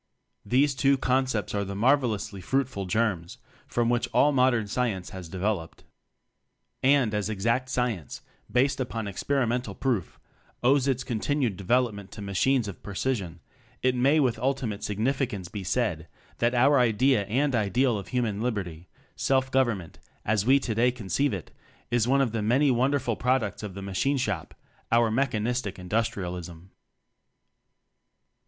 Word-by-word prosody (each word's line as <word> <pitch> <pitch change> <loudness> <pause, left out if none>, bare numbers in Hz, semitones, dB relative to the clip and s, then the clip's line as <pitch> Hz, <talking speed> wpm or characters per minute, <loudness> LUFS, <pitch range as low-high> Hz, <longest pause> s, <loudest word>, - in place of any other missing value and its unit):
These 135 +6 +2
two 135 +1 +3
concepts 130 -4 0
are 100 -1 0
the 100 0 -5
mar 125 +8 +5
velously 110 -7 -4
fruitful 120 -4 -1
germs 95 -5 -1 0.3
from 120 -1 0
which 120 0 +1
all 150 - +5
modern 125 -4 +3
Science 100 -4 -2
has 95 -4 -8
developed. 95 -2 -3 1.0
And, 135 -5 +3
as 105 0 -1
exact 115 +5 0
science 120 - -2 0.3
based 135 +2 +2
upon 115 -4 -3
experimental 120 0 -1
proof 115 - -2 0.4
owes 135 +2 +4
its 130 -2 0
con 115 -3 -3
tinued 135 -5 0
development 100 -1 0
to 105 - -8
machines 110 +5 +1
of 100 - -8
precision; 100 -4 -3 0.4
it 130 0 +3
may 135 +5 +3
with 125 -6 +1
ultimate 125 -5 -2
sig 105 - -3
nificance 110 -7 -1
be 100 -2 -5
said 90 -6 -1 0.3
that 120 +1 +2
our 135 +3 +5
idea 125 -1 +3
and 135 +5 +1
Ideal 115 +1 +1
of 100 - -9
Human 115 -5 -1
Liberty, 95 -8 -3 0.3
self 130 -1 +1
govern 130 -5 +2
ment, 85 -4 -12 0.3
as 105 0 +1
we 135 +2 +6
today 120 -1 +1
conceive 125 +4 -1
it, 95 -5 -6 0.4
is 120 -1 +2
one 135 +2 +3
of 130 -5 +1
the 115 -1 -2
many 130 +7 +3
wonderful 130 -1 +1
products 125 -5 0
of 105 -3 -7
the 100 - -6
machine 100 +9 0
shop 105 - -3 0.4
our 115 -1 +4
Mechan 120 -3 0
istic 120 -4 -2
Industrialism. 90 -4 -3
115 Hz, 150 wpm, -27 LUFS, 100-130 Hz, 1.0 s, we